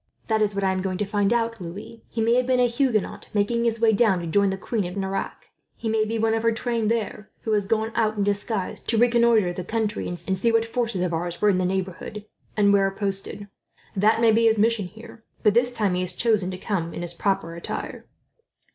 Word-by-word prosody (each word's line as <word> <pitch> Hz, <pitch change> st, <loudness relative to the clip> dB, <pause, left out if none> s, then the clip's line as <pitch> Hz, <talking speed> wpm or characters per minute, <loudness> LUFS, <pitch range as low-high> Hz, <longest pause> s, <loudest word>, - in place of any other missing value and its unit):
"That 220 Hz, -1 st, +1 dB
is 210 Hz, -1 st, +1 dB
what 200 Hz, -, -1 dB
I 190 Hz, -, +2 dB
am 185 Hz, 0 st, -1 dB
going 185 Hz, -1 st, -2 dB
to 210 Hz, -, -1 dB
find 205 Hz, 0 st, +1 dB
out, 230 Hz, -2 st, 0 dB
Louis. 200 Hz, +6 st, -8 dB
He 230 Hz, -, -3 dB
may 230 Hz, +1 st, +3 dB
have 250 Hz, +1 st, +2 dB
been 255 Hz, -1 st, +2 dB
a 250 Hz, -, +5 dB
Huguenot, 240 Hz, -3 st, -1 dB
making 235 Hz, +3 st, +1 dB
his 230 Hz, -1 st, 0 dB
way 225 Hz, -1 st, +4 dB
down 205 Hz, -4 st, +3 dB
to 170 Hz, -, -5 dB
join 200 Hz, +4 st, +2 dB
the 190 Hz, -, -2 dB
Queen 215 Hz, +2 st, -2 dB
of 180 Hz, +3 st, -7 dB
Navarre 195 Hz, 0 st, -2 dB
at -, -, -11 dB
Nerac -, -, -30 dB, 0.2 s
He 225 Hz, -, -4 dB
may 220 Hz, 0 st, +2 dB
be 225 Hz, +1 st, -2 dB
one 225 Hz, 0 st, +1 dB
of 225 Hz, -, 0 dB
her 230 Hz, 0 st, +3 dB
train 230 Hz, -1 st, -1 dB
there, 215 Hz, -1 st, -2 dB
who 220 Hz, -, -3 dB
had 205 Hz, -2 st, +1 dB
gone 220 Hz, 0 st, 0 dB
out, 220 Hz, -2 st, 0 dB
in 205 Hz, -, +1 dB
disguise, 205 Hz, 0 st, -2 dB
to 230 Hz, -, -1 dB
reconnoitre 235 Hz, -5 st, +4 dB
the 180 Hz, -, -5 dB
country 215 Hz, +2 st, -2 dB
and 175 Hz, -, -4 dB
see 190 Hz, +6 st, 0 dB
what 225 Hz, 0 st, +2 dB
forces 230 Hz, -4 st, -1 dB
of 175 Hz, -2 st, -1 dB
ours 175 Hz, +1 st, -3 dB
were 210 Hz, -, +4 dB
in 185 Hz, -2 st, +2 dB
the 185 Hz, -, +1 dB
neighbourhood, 190 Hz, +2 st, -4 dB, 0.3 s
and 200 Hz, -1 st, +4 dB
where 195 Hz, -1 st, +4 dB
posted. 195 Hz, +1 st, -3 dB, 0.5 s
That 215 Hz, +3 st, +3 dB
may 230 Hz, -1 st, +6 dB
be 230 Hz, +1 st, +3 dB
his 225 Hz, -1 st, +4 dB
mission, 215 Hz, -2 st, +2 dB
here; 225 Hz, +3 st, -13 dB, 0.2 s
but 210 Hz, -2 st, +5 dB
this 245 Hz, +2 st, +3 dB
time 210 Hz, -6 st, 0 dB
he 180 Hz, -, 0 dB
has 180 Hz, 0 st, -2 dB
chosen 215 Hz, -3 st, +1 dB
to 185 Hz, -, -5 dB
come 180 Hz, -4 st, -3 dB
in 175 Hz, -, -4 dB
his 175 Hz, 0 st, -2 dB
proper 190 Hz, -2 st, -1 dB
attire." 170 Hz, -, -6 dB
210 Hz, 245 wpm, -24 LUFS, 190-230 Hz, 0.5 s, may